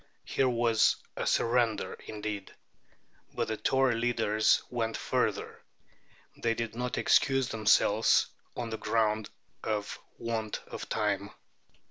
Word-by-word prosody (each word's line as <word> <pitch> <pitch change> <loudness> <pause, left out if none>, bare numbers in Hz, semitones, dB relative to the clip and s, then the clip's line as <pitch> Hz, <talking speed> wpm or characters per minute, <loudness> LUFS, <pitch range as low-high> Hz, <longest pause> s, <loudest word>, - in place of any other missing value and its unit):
Here 130 - +1
was 115 -2 +3 0.2
a - - -3
surrender 115 -1 +1
indeed! 105 -2 -5 0.8
But - - -1
the 110 - -2
Tory 130 0 +2
leaders 115 -2 +2
went 115 -2 -1
further. - - -1 0.8
They 115 -1 0
did 115 -1 -4
not 125 +1 -2
excuse 135 -2 +3
themselves 110 -1 +4 0.3
on 120 -2 -3
the 110 - -4
ground 110 -2 +1 0.3
of 105 -2 -2 0.2
want 115 -2 -3
of - - -8
time. - - 0
115 Hz, 115 wpm, -30 LUFS, 110-120 Hz, 0.8 s, themselves